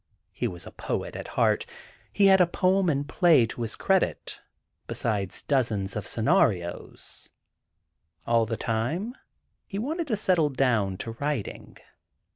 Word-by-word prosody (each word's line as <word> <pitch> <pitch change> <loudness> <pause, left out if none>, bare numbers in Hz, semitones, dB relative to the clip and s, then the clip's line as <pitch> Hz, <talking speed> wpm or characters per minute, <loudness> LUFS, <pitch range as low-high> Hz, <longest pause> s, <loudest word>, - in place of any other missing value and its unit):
He - - -2
was 85 -1 -7
a - - -9
poet - - -4
at - - -6
heart. - - +1 0.4
He 200 - +3
had 190 -1 +7
a 180 - +5
poem 185 +1 +2
and 140 -2 0
a - - -15
play 160 -9 +5
to 115 +1 -7
his 115 -2 -2
credit, 190 -1 0 0.5
besides 100 -5 -1
dozens 110 -8 0
of 105 - -4
scenarios. 110 - 0 1.0
All 115 -1 +2
the 115 0 -2
time 150 - -2 0.5
he 195 - -5
wanted 310 - -2
to 230 - +1
settle 180 -7 +2
down 115 -8 +1
to 115 - -4
writing. 140 -7 -4
135 Hz, 145 wpm, -27 LUFS, 110-185 Hz, 1.0 s, had